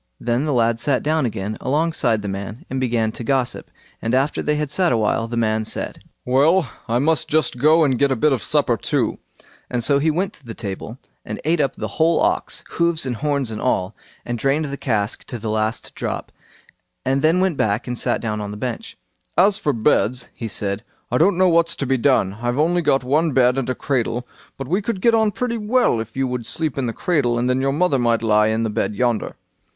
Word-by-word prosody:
Then 120 +4 0
the 150 - 0
lad 115 -2 +2
sat 130 +2 +1
down 155 -3 +1
again 105 -1 -4
alongside 135 -6 +1
the - - -3
man 100 +3 -6
and 135 - -1
began 115 -3 0
to 120 - -7
gossip, 130 0 -1 0.3
and 115 +2 0
after 135 +3 +1
they 150 - 0
had 150 -1 -2
sat 180 0 +2
a 120 - +2
while, 110 +1 0
the 120 0 -4
man 110 -1 +1
said, - - -3 0.2
"Well! 145 +6 +3 0.2
I 115 +1 +1
must 150 +2 +1
just 155 -5 +1
go 155 +4 +5
and 135 -5 +1
get 140 - +3
a - - +2
bit 150 +4 +2
of 125 - -1
supper - - +1
too"; - - -1 0.5
and 120 -2 -1
so 140 +3 +4
he 155 +3 +2
went 185 +6 -1
to - - -17
the 115 -3 -8
table 110 +2 -6 0.3
and - - -6
ate 160 0 +2
up 135 -3 0
the 110 - -4
whole 160 +1 +4
ox—hoofs, 170 -2 0
and 125 -3 -3
horns, 140 -4 -1
and 110 - -5
all—and 115 +2 -3
drained 140 +5 +1
the 140 -1 -4
cask 110 -6 -1
to 120 - -6
the 110 -1 -4
last 110 +1 -2
drop, - - -4 0.7
and 135 +1 +1
then 160 +4 +3
went 185 -3 +1
back 105 +2 0
and 125 - -3
sat 120 - -1
on 105 -2 -3
the 105 - -7
bench. 120 +1 -5 0.4
As 195 +3 +4
for 150 - +1
beds", 115 +1 +1
he 115 - -5
said, 100 0 -2 0.3
"I 125 - +2
don't 175 +2 +4
know 185 0 +4
what's 170 0 +3
to 140 - -3
be 130 0 +1
done. 115 -7 +2
I've 120 +1 -1
only 170 +4 +2
got 135 -4 +2
one 150 +4 +1
bed 125 -1 +4
and 135 -2 -2
a 130 - -1
cradle; 125 -2 -1 0.3
but 135 - -6
we 185 +8 +1
could 205 -1 -3
get 230 +4 +3
on 220 -1 +3
pretty 235 +2 -2
well 215 - +2
if 110 +2 -7
you 135 - +1
would 125 -2 -4
sleep 155 -5 -1
in 130 - -1
the - - -1
cradle, 125 -4 0
and 120 +1 0
then 125 +1 +1
your 135 0 +1
mother 150 -2 +2
might 115 -1 +1
lie 105 -1 +4
in 110 +1 0
the 110 - -1
bed 105 - -1
yonder." 120 -1 0
130 Hz, 225 wpm, -21 LUFS, 115-155 Hz, 0.7 s, go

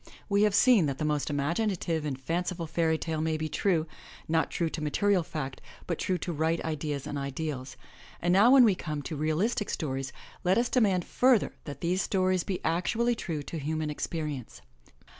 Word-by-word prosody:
We 200 -1 +2
have 210 -1 +3
seen 225 - +5
that 135 -1 -2
the 155 - -2
most 150 -1 0
imaginative 165 +2 -1
and 135 -3 -3
fanciful 170 +4 -2
fairy 160 0 +1
tale 160 -1 -3
may 160 0 0
be 155 0 -2
true, 165 -1 +1 0.4
not 160 0 +1
true 170 - -1
to 160 - -5
material 185 +6 +2
fact, 150 -5 -5 0.2
but 170 - -3
true 185 - 0
to 175 - -4
right 160 +2 +1
ideas 150 -3 -3
and 145 - -3
ideals, 140 -2 -4 0.4
and 175 +1 +1
now 205 +6 +6
when 265 -1 +8
we 215 -4 +5
come 155 -5 -4
to 155 - -5
realistic 160 +9 0
stories 135 -4 -3 0.3
let 185 +1 +3
us 240 0 +2
demand 195 -8 +2
further 250 -3 +3
that 145 - -7
these 180 +3 +1
stories 185 -2 +1
be 190 -2 -4
actually 220 +9 +1
true 165 -9 -4
to 165 - -5
human 155 +1 -2
experience. 150 -4 -5
160 Hz, 185 wpm, -29 LUFS, 150-185 Hz, 0.4 s, when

